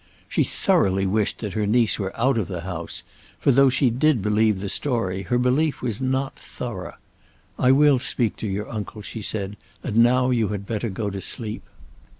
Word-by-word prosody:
She - - +1
thoroughly 95 0 +2
wished 105 +2 0
that 105 -4 -4
her 105 -2 0
niece 115 +1 +3
were 95 +2 -4
out 125 0 +3
of 105 - -2
the 90 -3 -5
house; 85 -2 -6 0.3
for - - +3
though 135 +1 +6
she 130 -1 +2
did 130 -2 +2
believe 105 -1 +2
the 100 - -4
story, 95 -6 -1
her 120 +5 0
belief 130 +5 +1
was 115 -2 -2
not 130 +1 -1
thorough. - - -7 0.6
"I 130 - +5
will 140 -1 +5
speak 120 -3 0
to 110 - -4
your 105 +2 -3
uncle," 105 -1 -6
she 110 - -6
said. 100 0 -3 0.3
"And 105 - -2
now 125 +2 +4
you 115 -4 +2
had 100 -1 -4
better 110 +1 -2
go 100 +1 -3
to 95 0 -5
sleep." 110 +1 -2
110 Hz, 190 wpm, -23 LUFS, 100-125 Hz, 0.6 s, though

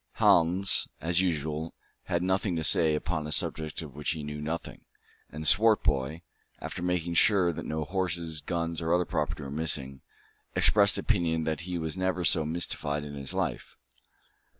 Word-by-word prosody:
Hans, 90 +4 +3
as 85 +2 +1
usual, 80 -2 -2 0.3
had 85 0 -1
nothing 95 0 0
to 80 - -2
say 80 0 +4
upon 75 0 -2
a - - -6
subject 80 +2 -2
of 75 -4 -10
which 75 +1 -2
he 80 -2 -6
knew 75 0 -5
nothing; 80 +3 -5 0.5
and 75 +1 -4
Swartboy, 85 -8 +3 0.4
after - - -6
making 90 -1 -1
sure 90 -1 +4
that - - -6
no 80 0 -2
horses, 85 -3 -2
guns, 85 +2 -3
or 80 0 -1
other 90 0 +3
property 75 - -2
were 70 - -7
missing, 70 -3 -1 0.5
expressed 100 -1 +5
the - - +2
opinion 85 -7 +1
that 80 +1 -2
he 90 - -2
was 80 +1 -3
never 95 -1 0
so 80 +1 +3
mystified 75 -2 -1
in 75 -1 -7
his 70 -1 -3
life. - - -3
80 Hz, 170 wpm, -28 LUFS, 75-90 Hz, 0.5 s, expressed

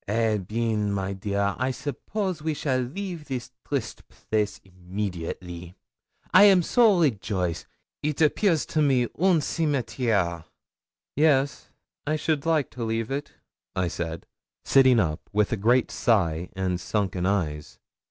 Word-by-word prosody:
Eh 110 +1 +1
bien, 105 +1 -1
my 100 -1 -2
dear. 100 +1 -1
I 130 +1 +1
suppose 165 - -3
we 155 0 -1
shall 130 -3 0
leave 165 +5 -5
this 125 -3 -5 0.2
triste 135 -6 -3
place 105 -2 -2
immediately. 90 -2 -6 0.6
I 195 +2 +9
am 190 -3 +6
so 220 -2 +4
rejoice. 100 - -1 0.3
It 150 -1 -2
appears 160 +2 +3
to 155 - 0
me 135 -4 +3 0.2
un 180 -3 +4
cimetière!' 120 - 0 0.7
'Yes, 140 -3 +2 0.4
I 155 - +1
should 155 0 -1
like 155 -4 +1
to 125 - -6
leave 115 +1 -2
it,' 140 +2 -4 0.4
I 90 -2 0
said, 80 -1 -5 0.4
sitting 130 -3 +5
up, 80 -6 -2
with 105 0 +2
a - - +2
great 120 +5 +2
sigh 90 -7 +1
and 90 -1 -2
sunken 95 -2 -1
eyes. 75 -7 -2
115 Hz, 135 wpm, -26 LUFS, 95-150 Hz, 0.7 s, I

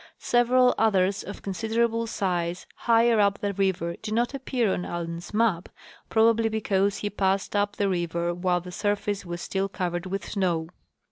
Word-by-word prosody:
Several 250 +1 +3
others 195 -3 +2
of 200 - -9
considerable 225 +3 0
size 180 -4 -2
higher 230 -1 +3
up 200 -1 +3
the 205 -1 -2
river 185 -3 0
do 220 - -5
not 235 +4 +1
appear 255 -6 0
on 180 - -2
Allen's 170 0 -5
map, 210 -5 +1 0.4
probably 225 0 +3
because 200 -2 0
he 205 - -2
passed 195 0 0
up 205 0 +1
the 200 - +1
river 170 -2 -1
while 175 0 0
the 180 +1 -9
surface 205 0 -2
was 175 0 -5
still 195 0 -1
covered 175 -2 -3
with 195 +1 -4
snow. 175 -5 0
200 Hz, 160 wpm, -26 LUFS, 180-220 Hz, 0.4 s, Several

